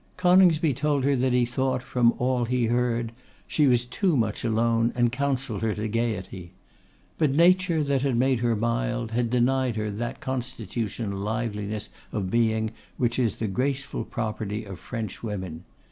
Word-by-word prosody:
Coningsby 180 -4 +5
told 140 +1 0
her 140 +1 +3
that 130 0 +1
he 125 -1 +3
thought, 130 +1 -1
from 120 -2 +3
all 125 -1 +1
he 125 0 +1
heard, 120 0 0 0.3
she 150 -2 +2
was 120 -1 +3
too 160 - +1
much 110 -3 -1
alone, 115 0 +2
and 120 -1 +2
counselled 130 -4 -2
her 110 -2 0
to 110 +1 -2
gaiety. 105 -6 -3 0.7
But 150 -4 +3
nature, 175 -1 +4
that 140 -2 +1
had 135 -3 +1
made 130 0 +2
her 120 -1 +1
mild, 120 +1 -1
had 120 0 0
denied 125 0 +2
her 105 -1 -2
that 120 +5 -4
constitutional 115 -5 -3
liveliness 105 -1 -3 0.2
of 95 -3 -3
being 110 -1 +1 0.3
which 120 0 0
is 115 -4 +1
the 110 - -2
graceful 135 +7 -1
property 110 -2 -4
of 95 -2 -8
French 110 -5 -5
women. 95 -6 -5
120 Hz, 160 wpm, -26 LUFS, 110-130 Hz, 0.7 s, Coningsby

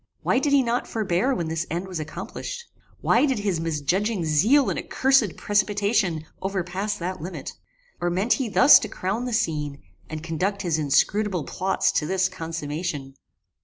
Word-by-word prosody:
Why - - +2
did 290 +1 0
he 280 -2 +5
not 240 0 -1
forbear 215 +4 0
when 170 -7 -2
this 165 +1 -2
end 175 +4 -3
was 180 -3 -5
accomplished? 475 - -6 0.4
Why 295 - +3
did 265 -3 0
his 200 -5 -1
misjudging 165 +5 -1
zeal 215 - +4
and - - -2
accursed 260 -8 +2
precipitation 205 -4 +1 0.2
overpass 195 +1 -2
that 180 -1 -4
limit? 180 +4 -6 0.5
Or 175 - 0
meant 190 +7 +2
he 260 -4 -2
thus 265 +7 +8
to - - -4
crown 205 +7 -3
the 250 - -3
scene, 150 -9 -1 0.3
and 155 0 -6
conduct 190 +5 -2
his 165 -3 0
inscrutable 180 +5 +1
plots 190 +6 0
to 150 - 0
this 190 +1 +1
consummation? 155 -3 -5
185 Hz, 165 wpm, -24 LUFS, 160-215 Hz, 0.5 s, thus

